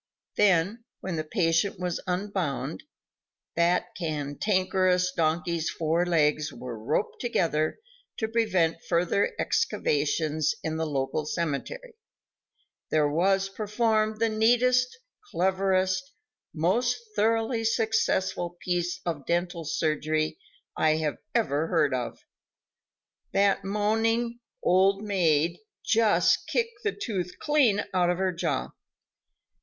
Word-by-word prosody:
Then, 200 +3 +2 0.2
when 185 -2 -3
the 155 - -2
patient 165 +2 +1
was 180 -2 -2
unbound 180 -7 -2 0.7
that 170 +1 +1
cantankerous 180 +4 0
donkey's 165 0 0
four 165 +2 0
legs 150 -3 +2
were 125 -3 -7
roped 150 - -1
together 165 -10 0 0.4
to 220 - -1
prevent 190 -8 +1
further 175 +3 +1
excavations 155 +1 0
in 160 0 -2
the 160 0 -1
local 145 +1 -2
cemetery 170 - -3 1.0
there 155 -1 +3
was 190 +6 +2
performed 215 +1 0
the 230 - +3
neatest, 245 - +3 0.3
cleverest, 190 - +1 0.4
most 230 +10 +1 0.2
thoroughly 225 +2 +1
successful 220 -6 0
piece 175 -1 -2
of 160 -5 -4
dental 175 0 -1
surgery 155 0 -1 0.4
that - - -3
I 155 -1 +2 0.2
ever 160 - +1
heard 155 -6 +2
of. 125 -2 -3 1.2
That 200 0 +3
moaning 225 +4 0 0.2
"Old 195 +3 +3
maid" 170 -4 +1 0.3
just 225 -1 +3
kicked 460 -2 -2
the 430 - +1
tooth 190 - -4
clean 260 -10 +3
out 180 -1 +3
of 175 - +1
her 190 0 +1
jaw. 170 - -2
180 Hz, 105 wpm, -27 LUFS, 160-215 Hz, 1.2 s, there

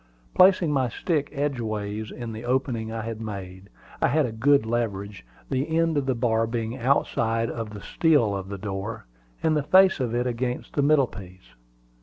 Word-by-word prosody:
Placing 185 -4 +5
my 130 -4 +1
stick 150 +3 -1
edgeways 110 -7 -3
in 120 -2 -6
the 110 +1 -7
opening 120 -3 -1
I 115 -1 -4
had 115 0 -5
made, 95 -3 -7 0.3
I - - +4
had 150 +2 +2
a 120 - -3
good 130 +3 +3
leverage, 105 - -3 0.3
the 140 +5 0
end 165 -1 +2
of 140 -2 0
the 130 - +1
bar 115 -1 +1
being 115 0 -3
outside 115 -3 +1
of 115 -2 -5
the 105 -1 -8
stile 145 -10 +2
of 95 0 -5
the 100 - -5
door, 100 - -5 0.4
and 160 -1 +3
the 150 - +2
face 190 +4 +5
of 120 -3 -1
it 120 +1 0
against 125 0 -3
the 145 - +1
middle 145 -1 +4
piece. 90 - -13
115 Hz, 185 wpm, -25 LUFS, 110-140 Hz, 0.4 s, Placing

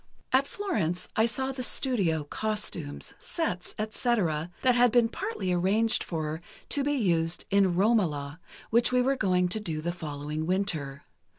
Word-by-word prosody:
"At 270 +2 +4
Florence 285 - -2
I 220 +1 +4
saw 265 +4 -2
the 265 -1 -5
studio, 200 - +2
costumes, 180 -4 -4
sets, 245 - -3
etc., 210 -8 0
that 255 -1 +5
had 245 -1 +4
been 235 -1 +4
partly 380 - -3
arranged 200 +6 +2
for, 155 -1 -4 0.3
to 285 - +1
be 290 +1 +1
used 170 - +1
in 195 -3 +3
'Romola,' 175 -8 +1 0.3
which 235 +2 +4
we 250 0 +3
were 270 +2 +2
going 180 -6 +2
to 220 - +1
do 165 -7 -3
the 170 +3 -2
following 155 -1 -5
winter. 165 -8 -1
195 Hz, 155 wpm, -28 LUFS, 165-240 Hz, 0.3 s, that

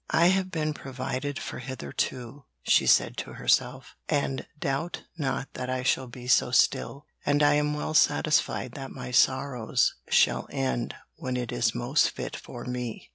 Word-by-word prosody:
'I 170 - +4
have 190 0 +1
been 155 -3 -1
provided 135 0 -4
for - - -6
hitherto,' 125 - -4 0.2
she - - +4
said - - +4
to - - -5
herself, - - 0
'and 135 -2 -1
doubt 145 +4 -2
not 135 -4 -3
that 125 0 -5
I 130 0 -1
shall 130 0 +1
be 125 0 -10
so 125 - +4
still, 140 +3 +1 0.2
and 145 +1 +2
I 145 0 +5
am 150 0 +1
well 150 +1 -3
satisfied 150 -4 +2
that 135 +1 -7
my - - -7
sorrows 125 -2 +2 0.2
shall 60 +1 +3
end 65 -2 -2 0.2
when 130 -1 -3
it 120 -2 -3
is 115 -1 0
most 125 +5 +2
fit - - -6
for - - -9
me.' 125 -2 -5
130 Hz, 165 wpm, -27 LUFS, 125-145 Hz, 0.2 s, I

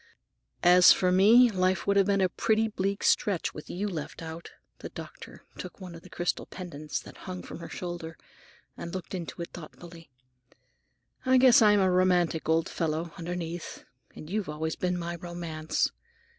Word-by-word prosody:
"As 180 +1 +8
for 180 -1 +3
me, 225 +6 +6
life 185 -2 +1
would 200 - +2
have 200 -1 +4
been 200 -1 +2
a 185 - +3
pretty 220 +4 +1
bleak 200 -1 -2
stretch, 195 -5 +1
with 150 - -10
you 200 +4 -3
left 165 -3 -6
out." 165 +1 -8 0.3
The - - -7
doctor - - -11 0.2
took - - -8
one 185 -3 -9
of 165 - -11
the 185 - -15
crystal 175 0 -2
pendants 155 -5 -6
that - - -13
hung 180 0 -6
from - - -9
her - - -8
shoulder 175 -2 -6 0.6
and 170 - -7
looked 185 - -6
into 175 -3 -6
it - - -10
thoughtfully. 165 -1 -11 1.1
"I 260 0 +4
guess 255 -2 +7
I'm 210 -1 +6
a 190 -1 +3
romantic 180 -3 +2
old 165 0 +2
fellow, 160 0 -2
underneath. 170 -1 -5 0.3
And 155 - -10
you've 200 0 -2
always 160 +1 -3
been 180 0 -1
my 170 0 -4
romance. 170 -2 -2
175 Hz, 170 wpm, -28 LUFS, 165-190 Hz, 1.1 s, As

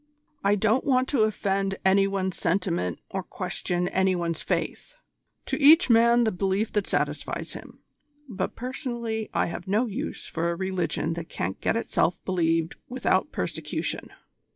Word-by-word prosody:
I 200 +1 +4
don't 220 +5 +2
want 255 -2 +2
to 240 -7 +3
offend 195 -2 0
any 195 +1 +5
one's 190 -2 -1
sentiment 170 - 0
or - - -2
question 180 0 -2
any 190 0 +2
one's 170 -2 -2
faith. - - -3 0.5
To - - -2
each 310 0 +7
man 235 +1 +6
the 220 - +2
belief 195 +3 0
that 210 -2 0
satisfies 145 0 -2
him, - - -11 0.4
but 195 -6 -3
personally 235 -3 -4
I - - +1
have 170 +1 -6
no 210 +6 +2
use 215 - -4
for 170 +1 -2
a 170 - -1
religion 180 -4 -1
that 165 -1 -6
can't 95 +2 -4
get - - +1
itself 180 -5 +1
believed 165 -3 +1
without 255 +1 +1
persecution." - - -3
195 Hz, 150 wpm, -26 LUFS, 175-225 Hz, 0.5 s, each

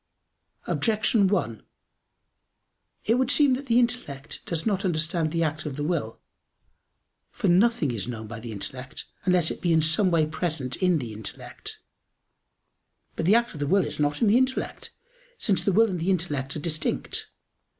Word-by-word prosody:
Objection 215 -2 +2
1: 120 - -1 1.4
It 225 - +3
would 260 -1 +1
seem 285 -3 +4
that 270 +2 -3
the 235 -1 +3
intellect 235 - -1
does 165 -2 -1
not 200 -3 0
understand 165 -2 0
the 165 0 +1
act 155 0 -2
of 140 - -5
the 145 - -3
will. 150 -9 -2 1.1
For - - -2
nothing 185 - +3
is 110 -3 -3
known 115 -3 -5
by 115 +1 -7
the 115 0 -7
intellect, 125 +5 -6 0.2
unless 180 -3 +3
it - - -7
be 175 - +1
in 160 -1 +4
some 160 +5 +4
way 165 -3 +3
present 155 -5 -2
in 180 -3 +3
the 120 -6 -5
intellect. 105 -1 -6 1.3
But 165 - -2
the 205 - +6
act 235 0 +2
of 150 - -9
the 145 - -1
will 190 +2 +3
is 150 - -6
not 145 +6 +1
in - - +4
the 210 +4 +5
intellect; 260 0 -2 0.5
since 200 -4 +1
the 200 - +2
will 225 +4 +5
and 180 - -3
the 170 +4 -1
intellect 150 -7 -1
are - - -3
distinct. 155 -1 -2
165 Hz, 175 wpm, -26 LUFS, 145-200 Hz, 1.4 s, the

